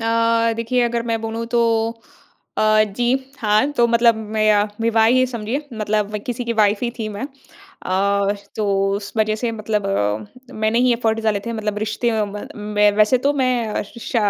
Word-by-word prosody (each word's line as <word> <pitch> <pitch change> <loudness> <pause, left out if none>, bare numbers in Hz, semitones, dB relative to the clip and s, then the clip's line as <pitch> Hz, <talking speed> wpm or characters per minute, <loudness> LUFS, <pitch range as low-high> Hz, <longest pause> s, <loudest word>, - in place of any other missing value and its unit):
अ, 230 0 +2
देखिए 235 +2 0
अगर 235 0 0
मैं 225 -1 0
बोलूँ 225 +1 -4
तो 235 - +4 1.0
अ, 215 0 +4
जी। 215 +4 -3 0.3
हाँ, 215 +5 +2
तो 240 -4 +3
मतलब 235 0 +4 0.2
मैं 215 0 +4
अ, 205 0 +3
विवाह 225 -1 +3
ही 255 +2 +4
समझिए 240 +3 -3
मतलब 210 -1 -1
किसी 245 0 -3
की 235 - -1
वाइफ़ 210 -1 +3
ही 235 - -1
थी 220 -1 -3
मैं। 205 0 -6 0.4
अ, 200 - -1 0.2
तो 215 - -1 0.3
उस 200 0 -6
वज़ह 215 0 +2
से 240 -2 0
मतलब 215 -2 -2
अ, 110 - -3
मैंने 220 +2 +1
ही 250 0 +4
एफ़र्ट 225 -1 0
डाले 215 -2 +1
थे 235 - -3
मतलब 210 -2 -3
रिश्ते 225 +2 -1
म 205 0 -7 0.3
में 210 0 +5
वैसे 215 +4 +4
तो 290 - +3
मैं 245 -4 0
श, 235 +4 -8
220 Hz, 180 wpm, -20 LUFS, 210-235 Hz, 1.0 s, में